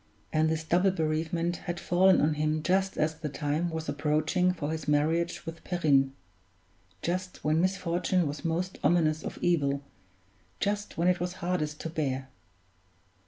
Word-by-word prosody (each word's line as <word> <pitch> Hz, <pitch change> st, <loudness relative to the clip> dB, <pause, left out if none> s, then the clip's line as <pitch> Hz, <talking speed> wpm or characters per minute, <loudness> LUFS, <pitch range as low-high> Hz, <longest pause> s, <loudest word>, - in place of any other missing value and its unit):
And 155 Hz, 0 st, +3 dB
this 160 Hz, 0 st, -1 dB
double 175 Hz, +4 st, +3 dB
bereavement 165 Hz, 0 st, -1 dB
had 175 Hz, 0 st, -2 dB
fallen 185 Hz, +2 st, +4 dB
on 150 Hz, +1 st, +3 dB
him 155 Hz, +1 st, 0 dB
just 190 Hz, +1 st, +1 dB
as 155 Hz, +1 st, +1 dB
the 155 Hz, -1 st, -5 dB
time 150 Hz, +4 st, -1 dB
was 160 Hz, -1 st, -4 dB
approaching 155 Hz, +5 st, +1 dB
for 155 Hz, -4 st, -3 dB
his 160 Hz, -2 st, -4 dB
marriage 160 Hz, +4 st, +1 dB
with 165 Hz, 0 st, -7 dB
Perrine; 140 Hz, -7 st, +2 dB, 0.9 s
just 180 Hz, +1 st, -3 dB
when 155 Hz, +2 st, +2 dB
misfortune 180 Hz, -1 st, +1 dB
was 145 Hz, +2 st, -4 dB
most 175 Hz, +2 st, -2 dB
ominous 155 Hz, 0 st, +3 dB
of -, -, -6 dB
evil, 140 Hz, -5 st, +1 dB, 0.8 s
just 205 Hz, -1 st, -2 dB
when 170 Hz, +2 st, +2 dB
it 180 Hz, -1 st, +3 dB
was 180 Hz, +1 st, -2 dB
hardest 170 Hz, -5 st, -2 dB
to 165 Hz, -, -4 dB
bear! 135 Hz, -4 st, -2 dB
160 Hz, 155 wpm, -29 LUFS, 150-180 Hz, 0.9 s, fallen